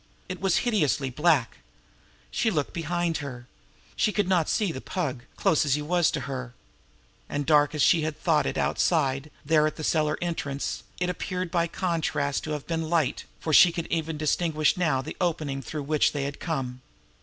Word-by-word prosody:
It 185 -1 -6
was 190 -3 +2
hideously 150 - +1
black. 150 - +2 0.7
She 230 - +1
looked 150 -9 -1
behind 170 0 -1
her. 125 -4 -7 0.5
She 210 - +2
could 205 -2 0
not 180 -4 +2
see 205 -5 +1
the 130 - -6
Pug, 140 -9 -3
close 155 - +2
as 140 -3 +2
he 150 - -3
was 175 +1 +2
to 150 - -2
her; 125 -2 -5 0.7
and 145 0 -2
dark 150 0 +4
as 150 - +2
she 170 - +5
had 155 -1 -3
thought 155 -4 +2
it - - -2
outside 140 -3 +1 0.2
there 155 0 +4
at 155 - -4
the 155 - -7
cellar 155 -1 +1
entrance, 145 -5 -3 0.2
it 180 0 0
appeared 180 0 -4
by 170 -1 +1
contrast 160 -6 -1
to 155 - -4
have 150 -2 -5
been 165 -1 -2
light, 165 -5 +1
for 160 - -2
she 175 - +8
could 170 -1 -4
even 160 -1 -1
distinguish 155 0 +1
now 155 -7 +1
the - - -7
opening 155 -6 -1
through 145 +4 -5
which 150 +1 +2
they 145 -2 -2
had 140 0 -4
come. 130 -6 -3
155 Hz, 190 wpm, -26 LUFS, 140-170 Hz, 0.7 s, she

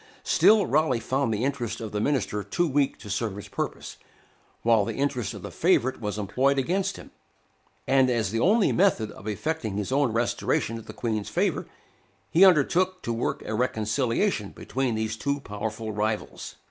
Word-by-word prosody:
Still 215 -2 +5
Raleigh 145 -5 +2
found 130 +1 0
the 110 +2 -1
interest 120 -6 -2
of 110 -2 -6
the 105 - -2
minister 105 -6 0
too 175 - 0
weak 140 -1 +1
to 105 - -12
serve 105 0 -2
his 105 - -8
purpose, - - -5 0.7
while 115 -2 +4
the - - -4
interest 125 -6 -1
of 100 - -9
the - - -6
favorite 130 -9 +1
was 105 -1 -3
employed 130 +7 +1
against 180 +8 0
him; - - -12 0.7
and, 130 -1 +4
as 115 -6 0
the 115 - -1
only 205 - +4
method 170 - +2
of 105 - -11
effecting 110 -1 -2
his 105 +3 -3
own 135 -2 +2
restoration 115 0 0
to - - -7
the - - -10
Queen's 110 -3 -2
favor, - - 0 0.6
he 175 - +6
undertook 185 +2 +4
to 120 - -2
work 115 - -2
a 110 - -3
reconciliation 115 - 0
between 130 -3 -2
these 110 0 -2
two 140 +5 -2
powerful 110 -1 -5
rivals. 105 +1 -3
120 Hz, 175 wpm, -26 LUFS, 110-140 Hz, 0.7 s, he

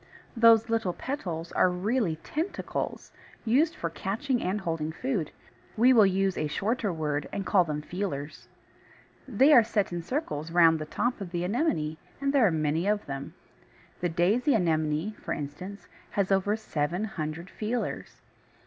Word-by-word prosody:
Those 230 -1 +6
little 225 -6 0
"petals" 175 - -4
are - - +3
really 190 0 0
tentacles, 325 +6 -4 0.3
used 290 +9 +3
for 165 - -3
catching 235 - -2
and 190 +3 -1
holding 160 -3 -2
food. 200 - -2 0.5
We 250 +4 +6
will 215 -5 +7
use 195 0 0
a 155 - 0
shorter 205 +7 -1
word 150 -3 -2
and 195 - -3
call 185 -3 +4
them 150 -1 -3
feelers. 155 -5 -5 0.8
They 270 +5 +5
are 240 - +8
set 210 -5 -1
in 175 - -2
circles 165 - -3
round 165 -2 +5
the 155 - -5
top 240 +6 -1
of 190 - -5
the 175 0 -2
Anemone, 180 - 0 0.2
and 275 0 0
there 260 -6 +5
are - - +2
many 160 +3 0
of 210 0 +1
them. 135 0 -6 0.6
The 175 - 0
Daisy 210 - +2
Anemone, 160 -1 +1
for - - -2
instance, 180 +7 -7 0.2
has 200 -1 -1
over 195 +2 +2
seven 175 -3 -2
hundred 165 -5 -4
feelers. 230 +3 -4
190 Hz, 160 wpm, -28 LUFS, 160-225 Hz, 0.8 s, are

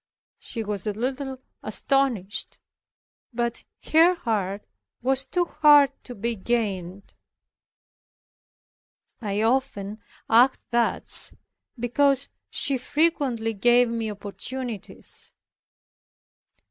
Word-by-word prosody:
She 230 -3 -3
was 205 -2 -4
a 210 - 0
little 265 +4 -3 0.2
astonished, 215 -2 0 0.7
but 235 -1 -2 0.3
her 335 +3 +6
heart 205 - -2 0.4
was 265 +1 +1
too 350 +6 +1
hard 295 -4 +6
to 245 - -8
be 230 +3 -2
gained. 195 -4 -3 2.1
I 210 -1 -1
often 225 -4 -1 0.3
acted 245 +4 +4
thus 235 -1 +2 0.4
because 275 +3 +1 0.2
she 275 -2 +2
frequently 265 -7 0
gave 240 +3 +4
me 230 -1 -2
opportunities. 210 +3 -4
240 Hz, 85 wpm, -25 LUFS, 210-270 Hz, 2.1 s, her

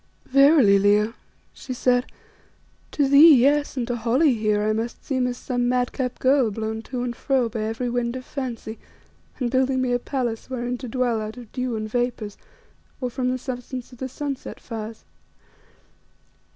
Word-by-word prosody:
"Verily, 275 -7 +6
Leo," 210 +2 +3 0.4
she 255 - -7
said, 245 0 +2 0.8
"to 285 -2 +1
thee, 290 +3 +8
yes; 285 +3 +2
and 245 - 0
to 245 0 -2
Holly 245 +6 +3
here 215 -2 +1
I 215 0 +1
must 225 +2 -4
seem 260 -3 0
as 245 0 -3
some 245 -1 -1
madcap 250 0 -1
girl 260 -2 +3
blown 220 +1 -4
to 250 -2 -3
and 240 -1 -3
fro 260 -1 +1
by 225 -1 -4
every 225 +3 -2
wind 240 0 -1
of 255 0 -7
fancy, 235 -5 -5 0.6
and 245 -3 -1
building 260 0 +2
me 255 -1 0
a 245 - +2
palace 245 -3 -3
wherein 245 -1 -3
to 255 - -6
dwell 240 -2 0
out 215 +2 -6
of 240 -3 -11
dew 250 -2 -2
and 215 0 -3
vapours, 235 -3 -2 0.6
or 250 -2 -3
from 250 +1 -1
the 255 - 0
substance 250 0 -6
of 250 - -14
the 260 - -4
sunset 275 +1 -5
fires. 225 -1 -7
245 Hz, 175 wpm, -24 LUFS, 225-260 Hz, 0.8 s, thee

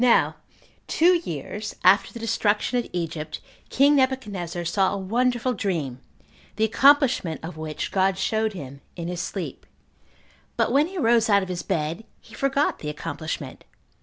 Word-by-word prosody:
3. 250 - +4
Now 235 - +4 0.5
two 350 +3 +4
years 210 - -6
after 190 +2 +5
the - - -9
destruction 225 +1 +1
of 240 - -5
Egypt, 160 -3 -4 0.3
king 285 +2 +4
Nebuchadnezzar 205 -11 -1
saw 190 +3 +2
a 200 - -2
wonderful 245 +5 0
dream, 160 - -2 0.6
the 220 - 0
accomplishment 255 - +4
of 165 0 -6
which 155 -1 -5
God 190 0 +2
showed 220 +3 0
him 140 -6 -9
in 170 -1 -5
his 175 -1 -3
sleep; - - -5 0.9
but - - +2
when 290 +3 +4
he 380 +2 -8
arose 235 -6 +3
out 200 -1 +4
of 190 - -7
his 175 -1 -3
bed, 165 +2 -2 0.2
he - - -18
forgot 275 +1 0
the 150 - -5
accomplishment. 150 -2 -5
200 Hz, 160 wpm, -24 LUFS, 170-245 Hz, 0.9 s, after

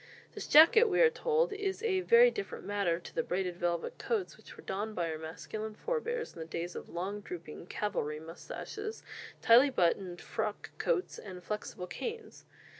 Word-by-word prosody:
This - - -6
jacket, 330 +10 +8
we 395 -5 +1
are 475 -1 +7
told 470 -1 +1
"is 405 +1 -3
a 380 -5 +2
very 470 +5 +7
different 405 -3 -6
matter 200 -5 +1
to 175 - -11
the - - +1
braided 180 -1 -2
velvet 175 -1 -2
coats 430 -6 -1
which - - -14
were 435 - -12
donned 210 +3 -3
by 170 -2 -1
our 155 - -5
masculine 215 +7 -6
forbears 470 - -2
in - - -11
the 160 - -4
days 170 +2 -4
of - - -7
long 190 +4 -3
drooping 170 -3 -8
cavalry 150 -9 -2
moustaches, 420 - -7 0.4
tightly 245 +5 +7
buttoned 180 -4 +1
frock 215 -2 -4
coats, 430 -7 0
and 185 -3 -9
flexible 210 -2 -4
canes. 450 - -6
215 Hz, 175 wpm, -32 LUFS, -, 0.4 s, jacket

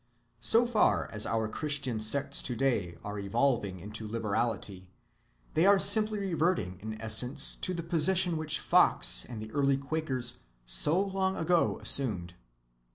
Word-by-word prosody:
So 230 +2 +4
far 235 -3 +2
as 105 -1 -2
our 110 -1 -1
Christian 140 -2 -1
sects 140 +6 0
to‐day 120 -8 -1
are 105 0 -5
evolving 100 -2 0
into 105 +4 -7
liberality, 105 -4 -3 0.6
they 165 +4 +3
are 200 0 +6
simply 215 +2 +4
reverting 165 - -1
in 110 +1 -7
essence 125 +5 -1
to - - -3
the 170 - -4
position 175 +1 +1
which 155 -1 -1
Fox - - +3
and 115 -3 -8
the 110 0 -8
early 140 0 +1
Quakers 135 -4 -2 0.3
so 150 - +1
long 190 -1 -1
ago 170 +1 +1
assumed. 95 -11 0
130 Hz, 140 wpm, -30 LUFS, 110-165 Hz, 0.6 s, are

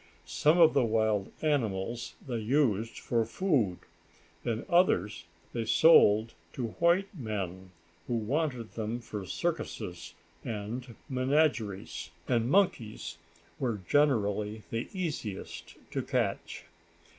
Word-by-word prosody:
Some 150 - +3
of 165 -2 +7
the 135 - +4
wild 110 -3 +1
animals 120 -6 -1
they 120 -3 -2
used 115 -2 +1
for 115 -2 0
food, 115 - +1 0.7
and 115 -1 -2
others 105 - +2 0.3
they 115 - -1
sold 110 -5 +6 0.2
to 120 -3 -3
white 180 +4 +3
men 95 - -4 0.4
who 120 - 0
wanted 125 0 -1
them 110 +1 -3
for 105 -5 -7
circuses 95 - -4 0.3
and 115 +2 -5
menageries. 130 - 0 0.2
And 120 -1 +1
monkeys 110 - +1 0.4
were 115 -7 -1
generally 105 -7 +2
the 115 +1 -3
easiest 150 - -5 0.2
to - - -1
catch. - - -2
115 Hz, 110 wpm, -30 LUFS, 105-145 Hz, 0.7 s, of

